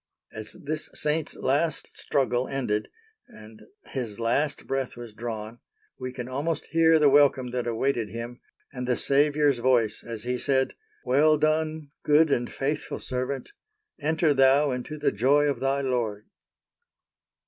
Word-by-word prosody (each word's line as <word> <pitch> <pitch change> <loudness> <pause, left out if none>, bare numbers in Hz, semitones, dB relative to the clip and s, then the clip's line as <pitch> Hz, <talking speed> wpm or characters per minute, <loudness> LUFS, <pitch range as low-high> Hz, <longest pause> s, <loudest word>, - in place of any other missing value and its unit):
As 110 0 -8
this 155 +2 -5
saint's 150 +1 -1
last 150 +4 0
struggle 130 -3 0
ended 125 -6 -2 0.4
and 110 0 -14 0.2
his 120 -6 -5
last 140 +6 0
breath 135 -2 -3
was 120 -3 -9
drawn, 110 0 -6 0.4
we 130 0 -4
can 125 -1 -6
almost 145 +5 -2
hear 165 0 +5
the 150 -2 +5
welcome 135 -3 +4
that 125 -1 -2
awaited 115 -1 0
him, 115 +3 -7 0.3
and 125 -2 -5
the 125 - +1
Saviour's 145 -1 +3
voice 120 -4 +2
as 115 -2 -6
He 125 0 -2
said,—"Well 155 - +1
done 155 -1 0
good 150 +1 +4
and 120 -2 0
faithful 145 +3 -3
servant—enter 160 - -3
thou 135 +1 +4
into 125 +4 -5
the - - +1
joy 135 +8 +3
of 145 -1 0
thy 135 +1 0
Lord." 120 -6 -2
135 Hz, 135 wpm, -26 LUFS, 120-150 Hz, 0.4 s, hear